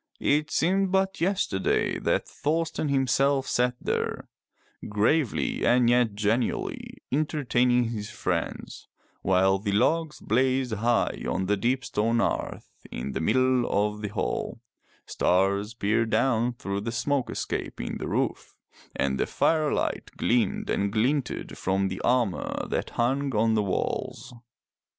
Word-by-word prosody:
It 150 +1 +1
seemed 190 +3 +1
but 190 -1 +1
yesterday 175 - 0
that - - 0
Thorsten 160 0 -1
himself 135 0 +2
sat 125 0 +1
there, - - -2 0.6
gravely 115 +6 +1
and 120 -1 +4
yet 120 -4 +2
genially 110 +4 -1
entertaining 125 -5 +1
his 105 -2 -5
friends - - -4 0.3
while 95 +1 +3
the 100 0 -2
logs 150 +9 +1
blazed 130 +1 +1
high 115 +3 0
on 95 - -1
the 105 +2 +2
deep 125 +5 0
stone 115 +2 0
hearth 115 - -2 0.2
in 65 +3 -5
the 65 - -3
middle 130 +6 +2
of 105 +1 0
the 105 - -2
hall, 100 - -3 0.5
stars 100 +4 +1
peered 110 +1 +1
down 120 +1 +2
through 100 -4 -4
the 115 +2 -3
smoke 130 +2 -1
escape - - -4
in - - -4
the - - -4
roof, - - -2 0.4
and 65 -1 0
the - - +1
firelight 155 -2 0
gleamed 115 -4 +1
and 100 0 0
glinted 125 +5 -1
from 95 +1 0
the 95 - -5
armor 120 -6 0
that - - -2
hung 135 +2 0
on 110 +1 +3
the 110 - +2
walls. 100 +4 -3
120 Hz, 135 wpm, -26 LUFS, 105-135 Hz, 0.6 s, and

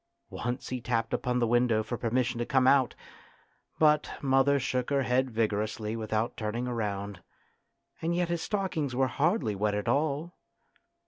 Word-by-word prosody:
Once 120 +1 -4
he 130 -1 -3
tapped 115 -1 -1
upon 125 -1 0
the 120 - +2
window 120 -1 +2
for 120 - -4
permission 120 +1 0
to - - +1
come 130 -3 +3
out, 130 -1 +4 0.8
but 150 -1 +3
mother 135 +1 +3
shook 125 -1 -1
her 140 -1 +2
head 130 +1 +1
vigorously 110 -1 -1
without 110 +1 -2
turning 115 +1 -3
round; 100 -5 -3 0.8
and 170 +1 0
yet 175 0 +1
his 170 -1 -1
stockings 180 - -2
were 135 +1 +3
hardly 140 - +1
wet 105 +1 0
at 105 - -3
all. 150 +4 0
125 Hz, 155 wpm, -29 LUFS, 110-140 Hz, 0.8 s, out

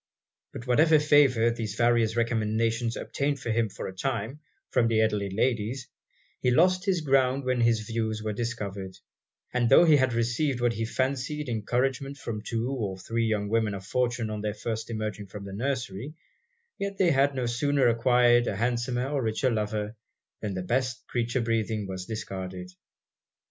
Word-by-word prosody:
But 120 - -8
whatever 155 +6 +5
favour 140 -6 +4
these 110 -3 -4
various 115 -1 +2
recommendations 115 0 0
obtained 140 0 -2
for 115 - -3
him 110 -1 +1
for - - -7
a 95 - -7
time, 120 +5 -3 0.3
from 115 - +3
the 115 -1 +2
elderly 105 -2 +1
ladies, 115 +4 -1 0.5
he 125 - +1
lost 180 +8 +3
his 185 -4 +1
ground 135 -2 +2
when 125 -1 0
his 115 -2 +3
views 110 -1 -3
were 110 -1 -2
discovered; 100 -5 -4 0.6
and 120 -2 +2
tho' 150 +6 +7
he 155 -3 +6
had 130 -2 +2
received 120 +4 0
what 120 -1 +2
he 115 0 -2
fancied 135 +5 -2
encouragement 130 +5 -1
from 115 -5 -5
two 115 +2 -2
or 105 -8 -3
three 115 +5 -1
young 105 -2 0
women 110 -1 +1
of 95 -1 -8
fortune 120 -1 -1
on 105 -1 -4
their 105 0 -2
first 110 +1 -4
emerging 110 -2 -4
from 100 +1 -9
the 100 - -7
nursery, 125 +2 -3 0.6
yet 200 0 -3
they 185 -4 +4
had 140 0 +3
no 130 -2 -1
sooner 135 +3 +2
acquired 120 0 +4
an 100 - -2
handsomer 120 +2 0
or 140 -1 -1
richer 115 +3 0
lover, 105 0 -2 0.4
than 105 -3 -4
'the 95 - -3
best 125 +4 -1
creature 120 +1 0
breathing' 110 -2 -1
was 95 -1 -6
discarded. 95 -4 -6
115 Hz, 170 wpm, -27 LUFS, 110-130 Hz, 0.6 s, tho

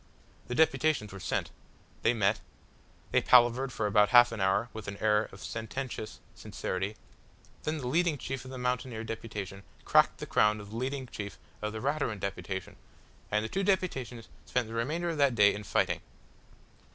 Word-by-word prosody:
The 125 - -3
deputations 155 -8 +2
were 95 - -7
sent. - - -2 0.5
They - - +4
met. 105 -1 +2 0.7
They - - +4
palavered 125 +2 +5
for 110 - -2
about 105 0 +4
half 120 -1 +7
an 115 -3 -4
hour 95 +4 +2
with 110 -1 -7
an 100 0 -5
air 105 0 +2
of 95 - -11
sententious 115 0 -5
sincerity, 95 +3 -4 0.7
then 155 +1 0
the 130 -4 -4
leading 165 +2 +2
chief 135 -2 -5
of 130 - -10
the 130 - -7
mountaineer 125 -2 -2
deputation 105 -3 -6 0.2
cracked - - +4
the - - -6
crown 105 0 +3
of 105 0 -10
the - - -7
leading 130 +2 -2
chief 100 -4 -7 0.2
of 105 0 -2
the 110 0 -6
Raturan 140 -6 0
deputation, 95 -1 -4 0.5
and 105 +1 +1
the - - -4
two 195 - -1
deputations 135 - -1 0.2
spent 125 -3 0
the 110 - -8
remainder 150 +10 -1
of 160 - -4
that 140 -4 +4
day 105 -2 +6
in 105 - -6
fighting. - - +1
115 Hz, 175 wpm, -30 LUFS, 105-130 Hz, 0.7 s, half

